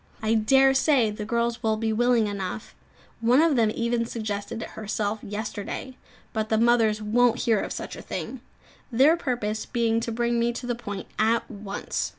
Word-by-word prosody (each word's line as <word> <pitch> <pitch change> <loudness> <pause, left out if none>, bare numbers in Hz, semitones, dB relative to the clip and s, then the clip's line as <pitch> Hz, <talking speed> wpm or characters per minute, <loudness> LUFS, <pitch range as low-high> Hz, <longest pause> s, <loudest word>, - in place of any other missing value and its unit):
I 220 +1 +2
dare 265 +5 +5
say 265 -5 +3
the 210 0 -6
girls 235 +1 -1
would 220 -2 0
be 220 -1 0
willing 240 0 +3
enough 200 0 -5 0.5
one 240 +4 +4
of 320 -2 +4
them 225 -3 +3
even 235 0 0
suggested 220 0 -4
it - - -7
herself 215 0 -3
yesterday; 210 +4 -5 0.4
but 220 -1 -2
the 220 - +2
mothers 225 -2 +3
won't 240 +2 +3
hear 225 -4 +2
of - - -4
such - - -5
a - - -8
thing, - - -6 0.5
their 270 +7 +5
purpose 240 -9 -2
being 230 -2 +1
to 230 0 -3
bring 235 +1 0
me 235 +1 +1
to 245 - -6
the 245 - -1
point 205 -5 -6
at 225 +2 +2
once. 200 -2 -4
230 Hz, 180 wpm, -25 LUFS, 215-240 Hz, 0.5 s, dare